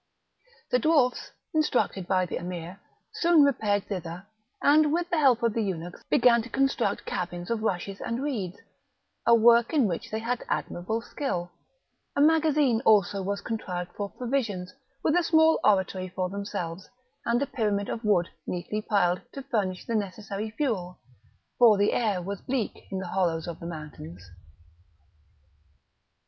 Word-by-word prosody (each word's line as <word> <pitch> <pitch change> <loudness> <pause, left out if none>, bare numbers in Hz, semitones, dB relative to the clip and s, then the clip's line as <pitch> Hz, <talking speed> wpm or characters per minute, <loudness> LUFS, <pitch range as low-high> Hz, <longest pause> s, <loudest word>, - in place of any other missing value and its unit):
The 250 - +4
dwarfs, 270 -3 +2 0.2
instructed 250 - +1
by 185 -1 +2
the 175 - -4
Emir, 175 +1 -6 0.3
soon 335 -3 +5
repaired 210 -7 +2
thither, 180 -1 -6 0.3
and, 300 +1 +4
with 345 +2 -1
the 340 - +2
help 255 -5 +4
of 230 -2 +2
the 230 - 0
eunuchs, 175 -4 -4
began 235 -1 +5
to 235 - -9
construct 270 -5 0
cabins 175 +2 -4
of 230 -2 -1
rushes 195 -2 -2
and 235 +4 -3
reeds, 205 -11 -3 0.7
a 235 - +8
work 235 +2 +5
in 285 -6 +4
which 175 -5 -3
they 220 - -2
had 235 +2 -2
admirable 220 +6 -2
skill; 180 -14 -3 0.6
a - - 0
magazine 300 -5 +4
also 200 -3 +4
was 200 +1 -2
contrived 180 -6 -4
for 205 -1 -3
provisions, 230 -8 -3 0.3
with 310 - +2
a 355 - +4
small 320 -1 +4
oratory 190 -2 +2
for 185 0 -3
themselves, 195 -3 -5 0.3
and 235 +1 +1
a - - 0
pyramid 210 -6 -1
of 230 - -4
wood 190 -5 +3 0.2
neatly 195 +4 -3
piled, 180 -4 +1
to 275 - -7
furnish 195 -7 -2
the 235 - -3
necessary 205 0 -3
fuel, 215 -8 -2 0.6
for 230 -4 +7
the 205 +1 +2
air 205 -6 0
was 200 +1 -5
bleak 255 -4 -3
in 190 - -3
the 190 -1 -4
hollows 170 -4 0
of 170 -1 -6
the 170 - -7
mountains. 95 - -9
210 Hz, 155 wpm, -27 LUFS, 180-245 Hz, 0.7 s, a